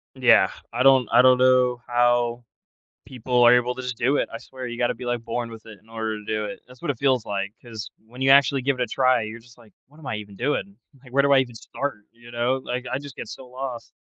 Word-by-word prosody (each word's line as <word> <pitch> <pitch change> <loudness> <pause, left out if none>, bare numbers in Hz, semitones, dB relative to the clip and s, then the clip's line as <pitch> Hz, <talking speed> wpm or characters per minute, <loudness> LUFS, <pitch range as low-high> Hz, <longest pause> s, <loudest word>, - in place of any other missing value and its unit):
Yeah, - - +5 0.2
I 120 +2 0
don't 130 -3 +5
I - - +7
don't 130 0 +6
know 125 -1 +3
how 120 0 +1 0.6
people 125 -1 0
are 120 - +8
able 125 0 +1
to 130 - -7
just 125 -1 -4
do 130 +6 +1
it, - - -1
I - - -4
swear 130 +1 -9
you 120 -1 -6
gotta 120 0 0
be, 125 +2 -9
like, 120 -1 -2
born 115 0 -3
with 115 -1 -11
it 110 -3 -12
in 110 - -26
order 110 -1 -4
to 105 - -12
do 110 -1 -2
it. 105 - -7
That's 125 0 -17
what 170 - -1
it 130 - -3
feels 130 -4 +2
like, 100 0 -4
'cause 110 -3 -8 0.2
when 125 +3 -13
you 135 - +2
actually 140 0 +5
give 135 0 -1
it - - 0
a - - 0
try, 130 0 +2
you're 110 +1 -6
just 120 +1 -19
like, 115 -3 -20
"What 145 - -22
am 155 - -13
I 110 - -2
even 105 -2 -9
doing?" 145 - -2 0.3
Like, 130 - -15
"Where 140 +1 +4
do 140 0 +3
I 135 - +7
even 125 -3 -1
start?" 140 +4 -4 0.2
You 120 0 -16
know, 120 +2 0
like, 125 0 -4
I 130 - -2
just 140 -1 -11
get - - -7
so 130 - -10
lost. 125 -2 -7
125 Hz, 270 wpm, -24 LUFS, 115-130 Hz, 0.6 s, are